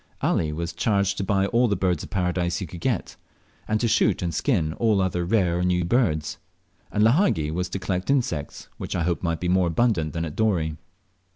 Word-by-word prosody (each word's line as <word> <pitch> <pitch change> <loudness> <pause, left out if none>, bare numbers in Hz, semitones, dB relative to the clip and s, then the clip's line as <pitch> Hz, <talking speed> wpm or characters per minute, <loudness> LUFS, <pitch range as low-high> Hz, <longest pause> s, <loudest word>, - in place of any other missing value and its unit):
Ali 80 -2 +1
was 85 +2 -4
charged 100 -3 +1
to - - 0
buy 95 0 +1
all 120 +4 +2
the 105 - +1
Birds 90 -4 0
of - - -9
Paradise 90 -2 -1
he 95 - -4
could 85 +1 -9
get, 120 -8 -2 0.5
and 110 0 +1
to 120 - +1
shoot 105 -4 +2
and 85 -1 -2
skin 80 - 0
all 110 +1 +2
other 90 -2 0
rare 90 -3 +1
or - - 0
new 90 -1 +1
birds; 85 - 0 0.5
and 105 - +2
Lahagi 115 - +3
was 90 +2 -2
to 95 - -3
collect 95 +1 -3
insects, 120 - -1
which - - -4
I 85 - 0
hoped 85 0 -1
might 85 -2 -1
be 90 - -2
more 90 0 +3
abundant 85 -4 +1
than 85 -1 -2
at 75 - -7
Dorey. 85 -8 +1
90 Hz, 210 wpm, -24 LUFS, 85-105 Hz, 0.5 s, Lahagi